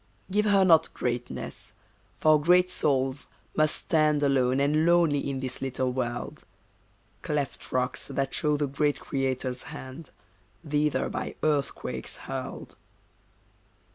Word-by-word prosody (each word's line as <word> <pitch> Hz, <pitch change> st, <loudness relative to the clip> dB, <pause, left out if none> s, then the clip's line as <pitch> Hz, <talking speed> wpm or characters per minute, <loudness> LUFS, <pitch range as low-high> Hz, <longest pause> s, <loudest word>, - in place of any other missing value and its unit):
Give 210 Hz, +2 st, +2 dB
her 200 Hz, -2 st, +5 dB
not 165 Hz, -3 st, +5 dB
greatness. 120 Hz, 0 st, -4 dB, 0.4 s
For 155 Hz, -1 st, +4 dB
great 180 Hz, +3 st, +4 dB
souls 135 Hz, -3 st, 0 dB, 0.3 s
must 155 Hz, 0 st, +3 dB
stand 155 Hz, -2 st, +2 dB
Alone 130 Hz, -2 st, +2 dB
and 150 Hz, +3 st, +2 dB
lonely 165 Hz, -5 st, +3 dB
in 135 Hz, -1 st, -3 dB
this 130 Hz, -1 st, -4 dB
little 130 Hz, -1 st, -1 dB
world: 120 Hz, -1 st, -4 dB, 0.8 s
Cleft 145 Hz, -3 st, -3 dB
rocks 130 Hz, 0 st, -1 dB
that 135 Hz, -1 st, -2 dB
show 150 Hz, -1 st, +1 dB
the 145 Hz, -, 0 dB
great 145 Hz, +1 st, 0 dB
Creator's 130 Hz, -2 st, -2 dB
hand, 130 Hz, +4 st, -9 dB, 0.6 s
Thither 150 Hz, 0 st, +1 dB
by -, -, -4 dB
earthquakes 150 Hz, -3 st, -1 dB
hurled. -, -, -7 dB
140 Hz, 120 wpm, -27 LUFS, 130-155 Hz, 0.8 s, her